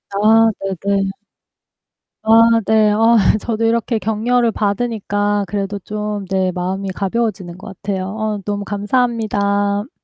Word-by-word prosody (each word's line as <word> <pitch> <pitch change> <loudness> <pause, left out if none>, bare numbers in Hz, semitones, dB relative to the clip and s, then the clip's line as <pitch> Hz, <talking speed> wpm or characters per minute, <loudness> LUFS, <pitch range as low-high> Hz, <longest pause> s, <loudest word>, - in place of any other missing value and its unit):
아 225 +2 +5
네네. 195 +1 -1 1.1
아 230 +1 +5
네. 220 -1 +3
아 225 +2 +4 0.2
저도 230 0 -3
이렇게 230 +1 +1
격려를 230 +2 +1
받으니까 205 -1 -1
그래도 200 +2 -3
좀 210 0 -4
네 190 -1 +1
마음이 185 +2 -3
가벼워지는 190 -2 -3
것 190 - -11
같아요. 195 -2 -3
어 215 0 -3
너무 205 -1 -3
감사합니다. 205 -1 0
205 Hz, 255 characters per minute, -18 LUFS, 200-225 Hz, 1.1 s, 아